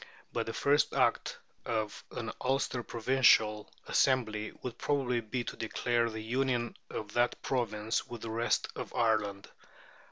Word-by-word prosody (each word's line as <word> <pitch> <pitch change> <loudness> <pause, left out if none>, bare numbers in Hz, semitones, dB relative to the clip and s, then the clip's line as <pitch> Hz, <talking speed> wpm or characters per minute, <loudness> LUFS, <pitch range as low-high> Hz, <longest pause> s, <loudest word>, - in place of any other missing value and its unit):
But - - -1
the 115 - -3
first 145 +4 +3
act - - +2 0.3
of 110 -3 -2
an - - -4
Ulster 130 -1 +1
Provincial 115 -2 +3
Assembly 110 -5 +2
would 125 -2 -5
probably 130 -4 +1
be 120 +3 -3
to - - -6
declare 115 +1 0
the 110 -1 -6
union 120 0 0
of 105 -1 -5
that 120 0 +2
Province 110 -3 -1
with 120 -2 -8
the 115 - -4
rest 115 +1 +1
of - - -6
Ireland. 105 -4 +1
115 Hz, 140 wpm, -32 LUFS, 110-125 Hz, 0.3 s, first